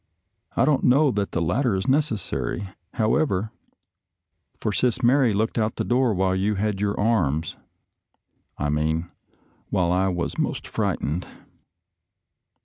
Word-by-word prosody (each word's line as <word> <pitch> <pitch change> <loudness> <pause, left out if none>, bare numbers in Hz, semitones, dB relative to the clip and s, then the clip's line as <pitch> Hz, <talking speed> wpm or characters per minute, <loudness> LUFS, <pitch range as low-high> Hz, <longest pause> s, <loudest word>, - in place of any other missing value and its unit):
I - - +4
don't 150 -3 +2
know 140 +3 +4
that 100 -3 -2
the 85 - 0
latter 110 - +1
is 95 +6 -2
necessary, 105 - -1 0.3
however, 110 -3 +1 1.1
for 105 - -1
Sis 125 +3 0
Mary 125 0 +4
looked 110 +3 0
out 110 0 0
of - - -42
the - - -1
door 125 -3 +2
while 95 0 +1
you 100 +3 0
had 100 0 -1
your 100 -1 -1
arms 80 -8 +1 0.5
— - - -48
I 75 - -1
mean, 80 +3 -1 0.6
while 90 -1 +1
I 95 +2 +2
was 90 -2 -2
most - - -2
fright - - -1
ened." 80 +6 -2
100 Hz, 145 wpm, -24 LUFS, 90-120 Hz, 1.1 s, I